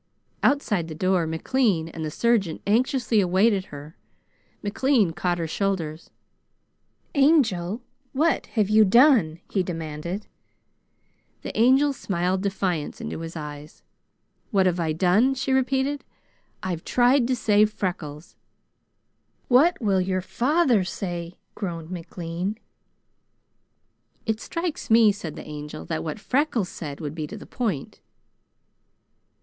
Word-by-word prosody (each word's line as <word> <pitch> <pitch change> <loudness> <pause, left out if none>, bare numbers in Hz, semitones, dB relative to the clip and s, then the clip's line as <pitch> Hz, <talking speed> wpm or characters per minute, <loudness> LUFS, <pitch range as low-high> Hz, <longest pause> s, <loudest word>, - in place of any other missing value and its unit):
Outside 210 - +1
the 160 - -7
door, 185 0 +1
McLean 170 +1 +1
and 165 -1 -7
the 155 - -2
surgeon 200 -2 +1
anxiously 235 0 +2
awaited 190 +2 +2
her. 145 0 -10 0.7
McLean 215 -2 +2
caught 175 +1 -1
her 170 - -2
shoulders. 165 -3 -2 1.0
"Angel, 245 - +2 0.3
what 315 +5 +1
have 210 -3 +3
you 215 +1 +6
done?" 215 - +5
he 195 - +1
demanded. 170 +2 -5 1.2
The - - -6
Angel 265 +5 +4
smiled 185 -5 -1
defiance 190 -5 -2
into - - -5
his 165 0 -7
eyes. 150 -1 -8 0.7
"'What 195 -5 +3
have 180 -1 +1
I 165 -2 0
done?'" 190 +11 +3
she 265 0 -1
repeated. 265 +2 +1 0.6
"I've 175 -3 -3
tried 245 0 +3
to 255 - +1
save 215 -2 +3
Freckles." 165 -6 -5 1.1
"What 290 +8 +5
will 195 -5 +2
your 185 0 -1
father 250 - +2
say?" 175 -2 -5 0.2
groaned 170 -4 -5
McLean. 175 +3 -4 1.7
"It 220 -1 -1
strikes 335 -2 -4
me," 225 -1 +6
said 175 -7 -7
the - - -9
Angel, 150 - -7
"that 80 - -3
what 210 - -4
Freckles 250 -5 0
said 145 -4 -7
would 150 -2 -4
be 155 -2 -4
to 215 - -8
the - - -10
point." 210 - -3
190 Hz, 125 wpm, -25 LUFS, 165-240 Hz, 1.7 s, you